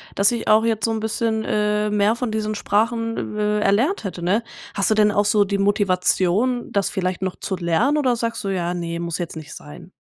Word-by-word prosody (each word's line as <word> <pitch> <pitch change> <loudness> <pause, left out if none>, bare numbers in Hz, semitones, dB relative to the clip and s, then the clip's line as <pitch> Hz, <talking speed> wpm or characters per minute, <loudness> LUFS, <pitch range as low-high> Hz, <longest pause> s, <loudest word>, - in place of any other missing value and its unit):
dass 200 +2 +4
ich 235 - -3
auch 215 +1 +5
jetzt 225 -2 0
so 225 - +1
'n 220 - -1
bisschen, 220 0 -1
äh, 210 0 0
mehr 210 +1 +2
von 240 -1 -3
diesen 215 0 -2
Sprachen, 225 +1 -1
äh, 210 0 +1
erlernt 235 - +1
hätte“, 185 -3 -5
ne? 195 +7 +1 0.3
Hast 200 - 0
du - - +4
denn 210 -1 +4
auch 205 +1 +2
so 210 0 +3
die 200 0 -1
Motivation, 200 +4 +1
das 200 -1 +1
vielleicht 185 -2 -2
noch 185 -1 -3
zu 190 - -3
lernen 185 - +1
oder 260 -5 +2
sagst 230 -1 -3
du: 200 - -2
„Ja, 175 -2 -1
ne, 170 -1 -4
muss 170 -2 -3
jetzt 170 -2 -5
nicht 150 -1 -9
sein?“ 75 0 -12
210 Hz, 220 wpm, -21 LUFS, 185-220 Hz, 0.3 s, auch